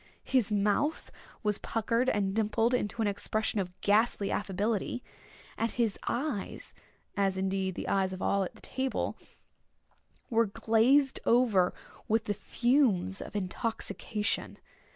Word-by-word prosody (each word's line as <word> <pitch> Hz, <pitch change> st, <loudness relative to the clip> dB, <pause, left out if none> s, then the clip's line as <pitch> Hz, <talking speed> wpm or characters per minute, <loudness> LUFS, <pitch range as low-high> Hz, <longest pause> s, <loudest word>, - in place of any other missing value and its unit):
His 250 Hz, -6 st, +1 dB
mouth 210 Hz, +9 st, +1 dB, 0.3 s
was 210 Hz, -1 st, +1 dB
puckered 230 Hz, +3 st, 0 dB
and 195 Hz, -2 st, 0 dB
dimpled 225 Hz, +2 st, +1 dB
into 225 Hz, -1 st, 0 dB
an -, -, +1 dB
expression 215 Hz, +1 st, -1 dB
of 180 Hz, -1 st, -4 dB
ghastly 205 Hz, -1 st, +2 dB
affability, 205 Hz, +4 st, -1 dB, 0.6 s
and 230 Hz, -, +1 dB
his 225 Hz, -3 st, -1 dB
eyes, 250 Hz, -6 st, -3 dB, 0.4 s
as 195 Hz, -2 st, +1 dB
indeed 190 Hz, -1 st, -1 dB
the -, -, -5 dB
eyes 190 Hz, -1 st, +1 dB
of 185 Hz, -, -6 dB
all 200 Hz, 0 st, +1 dB
at 185 Hz, -, -8 dB
table, 265 Hz, 0 st, -2 dB, 1.2 s
were 230 Hz, -1 st, +3 dB
glazed 240 Hz, +7 st, +3 dB
over 225 Hz, -7 st, +4 dB, 0.4 s
with 225 Hz, +1 st, +2 dB
the 210 Hz, -, -1 dB
fumes 210 Hz, -4 st, +1 dB
of -, -, -8 dB
intoxication. 210 Hz, +2 st, -2 dB
210 Hz, 125 wpm, -30 LUFS, 195-235 Hz, 1.2 s, over